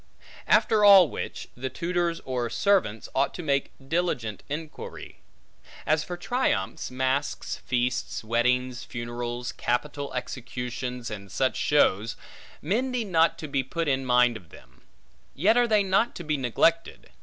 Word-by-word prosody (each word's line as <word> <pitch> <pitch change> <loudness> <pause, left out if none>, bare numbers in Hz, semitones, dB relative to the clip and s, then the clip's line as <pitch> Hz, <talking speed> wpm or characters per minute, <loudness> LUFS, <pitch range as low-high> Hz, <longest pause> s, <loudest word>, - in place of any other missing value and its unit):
After 215 -1 +4
all 195 -5 +9
which, - - -6
the 130 +2 -4
tutors, 170 +1 -1
or 125 -2 -2
servants, 145 - +1
ought 135 +1 +1
to 175 - -6
make 140 -2 0 0.2
diligent 135 - -1
inquiry. 155 +2 -7 0.7
As 155 0 +2
for 175 +2 -6
triumphs, 245 +8 -1
masks, 130 +2 -1
feasts, 125 -1 -2
weddings, 125 +2 0
funerals, 120 +1 -5
capital 140 +3 -2
executions, 125 -1 -5
and 100 -3 -8
such 130 +5 0
shows, 115 -7 +2 0.5
men 225 - 0
need 240 -5 -2
not 165 -2 +3
to 155 - -6
be 140 -1 0
put 165 +5 -3
in 135 -1 +1
mind 125 -2 +3
of 90 -7 -18
them; 65 0 -17 0.5
yet 195 +10 +3
are 245 0 +4
they 215 -3 +3
not 195 +5 +1
to 175 - -6
be 155 -1 0
neglected. 145 +6 0
135 Hz, 145 wpm, -26 LUFS, 120-170 Hz, 0.7 s, all